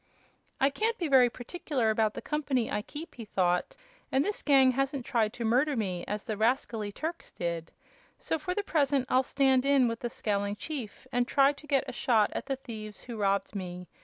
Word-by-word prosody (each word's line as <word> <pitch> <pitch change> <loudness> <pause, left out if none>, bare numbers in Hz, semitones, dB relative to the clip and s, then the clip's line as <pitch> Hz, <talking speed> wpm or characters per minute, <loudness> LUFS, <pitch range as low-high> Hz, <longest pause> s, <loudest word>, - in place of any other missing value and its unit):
"I 275 +1 +4
can't 450 +10 0
be 340 - -1
very 260 -3 +6
particular 255 -2 -2
about 215 -1 +1
the - - -6
company 280 -5 -1
I 210 - 0
keep," 310 +9 -9
he 235 - -8
thought, 180 -3 0 0.4
"and 270 +3 +2
this 415 - -2
gang 270 -3 +5
hasn't 275 0 -1
tried 220 -3 +1
to 235 - -4
murder 265 +6 +3
me, 185 -5 -2
as 210 0 -3
the 215 -3 -4
rascally 225 -2 0
Turks 325 +9 -5
did. 170 -1 -4 0.5
So 320 - -2
for 360 +4 -3
the 415 - -1
present 285 -7 +1
I'll 255 - +5
stand 265 -1 +2
in 275 -2 +4
with 230 0 -2
the 240 - -3
scowling 205 -2 -1
chief 255 -3 -6
and 245 0 +1
try 275 +1 +4
to 290 +1 -14
get 275 -3 +1
a 255 - -5
shot 225 -4 +2
at - - -4
the 270 - 0
thieves 220 -5 -8
who 240 - -7
robbed 200 -2 0
me. 180 -2 -5
250 Hz, 205 wpm, -29 LUFS, 215-280 Hz, 0.5 s, very